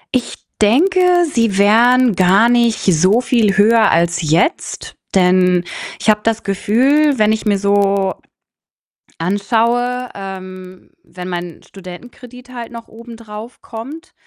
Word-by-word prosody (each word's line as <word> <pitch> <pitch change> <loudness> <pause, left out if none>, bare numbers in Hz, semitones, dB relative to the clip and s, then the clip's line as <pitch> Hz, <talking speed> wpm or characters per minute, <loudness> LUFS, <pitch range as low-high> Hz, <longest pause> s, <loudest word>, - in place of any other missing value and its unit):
Ich 250 - -2 0.3
denke, 325 - +2 0.3
sie 230 - -1
wären 235 +2 +3
gar 190 +5 +3
nicht 235 -2 +1
so 185 +5 +3
viel 225 -6 0
höher 220 +1 +4
als 170 +2 0
jetzt, 165 - -2 0.2
denn 180 -1 +2 0.4
ich - - -6
habe 210 0 +2
das 225 -1 -1
Gefühl, 260 +9 +1
wenn 215 0 +2
ich 220 0 -3
mir 205 -1 +2
so 200 -1 0 1.1
anschaue, 235 +7 -1
ähm, 185 -1 -10
wenn 180 +1 -10
mein 175 -1 -7
Studentenkredit 245 +7 -13
halt 240 -1 -8
noch 230 -1 -10
obendrauf 230 0 -12
kommt, 300 +11 -10
215 Hz, 120 wpm, -16 LUFS, 185-240 Hz, 1.1 s, höher